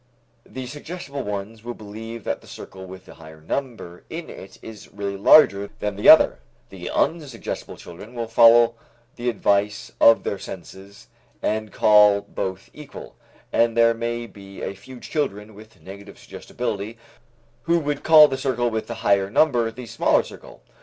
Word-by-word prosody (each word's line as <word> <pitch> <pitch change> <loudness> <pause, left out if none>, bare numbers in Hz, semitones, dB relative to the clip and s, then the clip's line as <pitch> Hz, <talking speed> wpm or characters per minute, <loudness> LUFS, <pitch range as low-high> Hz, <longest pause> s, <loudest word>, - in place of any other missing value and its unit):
The 130 -1 -7
suggestible 145 +1 -7
ones 105 +1 -6
will 120 0 -6
believe 110 +2 -9
that - - -3
the - - -18
circle 95 0 -11
with 95 0 -12
the - - -13
higher 80 -1 -14
number 100 - -6
in 165 +1 -7
it 95 - -12
is 110 -2 -11
really 100 -1 -5
larger 100 -1 +5
than 105 -1 -3
the 100 - +3
other, - - +7 0.3
the - - -8
unsuggestible 150 -8 -3
children 105 +8 -12
will 120 -1 -3
follow 115 +1 +5 0.4
the 120 0 -2
advice 100 -2 0
of 115 - +6
their 100 - -3
senses 95 +2 -11 0.4
and 110 -1 -2
call 105 -1 +5
both 95 -2 -6
equal, 150 -1 -11 0.4
and 115 0 +2
there 115 0 +5
may 120 +1 -4
be 100 -3 -12
a - - -4
few 120 +7 -13
children 110 -9 -4
with 110 -1 -16
negative 100 +2 -12
suggestibility 110 -2 -6 0.7
who 170 - +4
would 145 -3 -3
call 155 -1 +8
the 135 -2 -4
circle 120 -3 -1
with 110 0 -3
the 115 - -6
higher 100 -1 +2
number 120 -2 +2
the 120 +2 -10
smaller 115 0 +1
circle. - - -14
110 Hz, 160 wpm, -22 LUFS, 100-120 Hz, 0.7 s, call